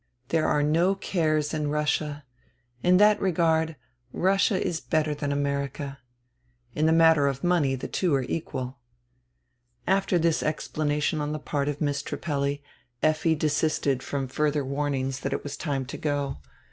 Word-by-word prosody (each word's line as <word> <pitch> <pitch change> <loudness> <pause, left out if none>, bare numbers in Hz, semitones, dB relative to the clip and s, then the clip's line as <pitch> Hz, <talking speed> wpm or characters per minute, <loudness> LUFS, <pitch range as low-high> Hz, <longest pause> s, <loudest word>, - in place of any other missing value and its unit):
There 160 -1 +2
are 150 -1 +2
no 170 +6 +3
cares 155 -6 0
in 150 -2 -1
Russia; 150 -1 -1 0.6
in 180 +1 +5
that 210 +1 +5
regard 160 -3 +2 0.4
Russia 195 - +2
is 165 - -2
better 155 -1 0
than 145 -1 -3
America. 140 0 -2 0.7
In 155 +1 +1
the - - +4
matter 160 -3 +5
of 135 -1 -2
money 170 -7 +2
the 130 - -5
two 175 -6 +1
are 135 - +1
equal." 130 -2 -4 1.1
After 195 -1 +2
this 165 -1 +2
explanation 150 0 -1
on 150 0 -2
the - - -2
part 145 -1 -2
of 145 0 -4
Miss 145 -2 0
Trippelli, 140 -1 -2 0.4
Effi 155 +1 +3
desisted 150 -3 0
from 135 -1 -3
further 150 +1 0
warnings 135 -1 -2
that 135 0 -3
it - - -3
was 145 0 -5
time 140 -4 -2
to 130 - -7
go. 145 -2 -1
150 Hz, 155 wpm, -26 LUFS, 140-160 Hz, 1.1 s, in